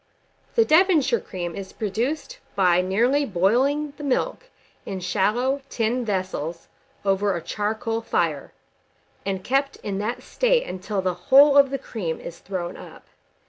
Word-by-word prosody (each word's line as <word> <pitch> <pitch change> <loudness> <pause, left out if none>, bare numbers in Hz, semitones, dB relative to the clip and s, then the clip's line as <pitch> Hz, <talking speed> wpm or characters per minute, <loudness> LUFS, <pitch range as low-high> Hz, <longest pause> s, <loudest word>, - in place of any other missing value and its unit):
The 455 - +5
Devonshire 310 - +4
cream 175 -2 -6
is 195 -1 -7
produced 255 - -3 0.2
by 180 -3 +4
nearly 235 +10 +2
boiling 265 +9 +1
the 295 - -8
milk 285 - -1 0.3
in 190 - -5
shallow 235 +9 0
tin 235 +2 0
vessels 185 -6 -3 0.4
over 195 0 +2
a 170 - -3
charcoal 220 +2 -2
fire, 165 -9 -1 0.8
and 190 -1 -2
kept 275 +2 +1
in 200 -2 -3
that 215 +4 -3
state - - +1
until 190 +1 -3
the 185 -1 +1 0.2
whole 280 +2 +8
of 280 -1 +7
the 275 - -2
cream 195 -11 -4
is 170 - -9
thrown 180 -3 -5
up. - - -12
220 Hz, 140 wpm, -24 LUFS, 190-275 Hz, 0.8 s, whole